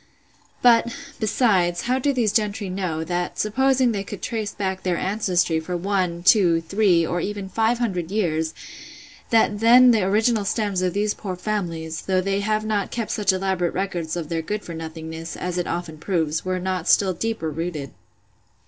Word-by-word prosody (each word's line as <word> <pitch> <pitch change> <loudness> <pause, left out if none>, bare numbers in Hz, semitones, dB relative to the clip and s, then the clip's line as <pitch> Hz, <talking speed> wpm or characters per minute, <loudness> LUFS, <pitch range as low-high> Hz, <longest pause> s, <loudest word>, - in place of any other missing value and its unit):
But, 235 -1 +5 0.3
besides, 195 -6 +2
how 255 +2 +1
do 280 +2 +1
these 235 -6 +1
gentry 205 -3 -1
know, 180 -4 -2
that, 175 +2 -3
supposing 260 +3 +2
they 200 -3 -2
could 200 -1 -8
trace 220 -3 -2
back 190 -2 -3
their 180 -2 0
ancestry 185 -5 +1
for 175 +2 -4
one, 180 -2 -1
two, 180 -4 +5
three, 175 0 +2
or 175 +1 -2
even 200 0 -4
five 225 +4 +1
hundred 185 -8 -2
years, 160 -6 -1 0.7
that 220 -2 +3
then 245 +3 +7
the 225 -3 +3
original 215 +3 +2
stems 200 -2 -1
of 180 -1 0
these 210 +1 +1
poor 190 -4 -5
families, 170 -5 -3
though 190 -1 +1
they 195 +1 0
have 215 +1 0
not 210 -2 -1
kept 230 -3 -3
such 205 -3 +2
elaborate 185 -2 -1
records 175 -4 -2
of 165 -3 -4
their 165 -1 -1
good 210 +6 -4
for 170 - -7
nothingness, 160 0 -7
as 180 0 -3
it 175 - -2
often 170 -2 -4
proves, 160 -3 -1
were 185 0 -1
not 185 0 -3
still 190 -2 +4
deeper 180 -4 -3
rooted? 155 -3 -4
190 Hz, 175 wpm, -23 LUFS, 170-215 Hz, 0.7 s, then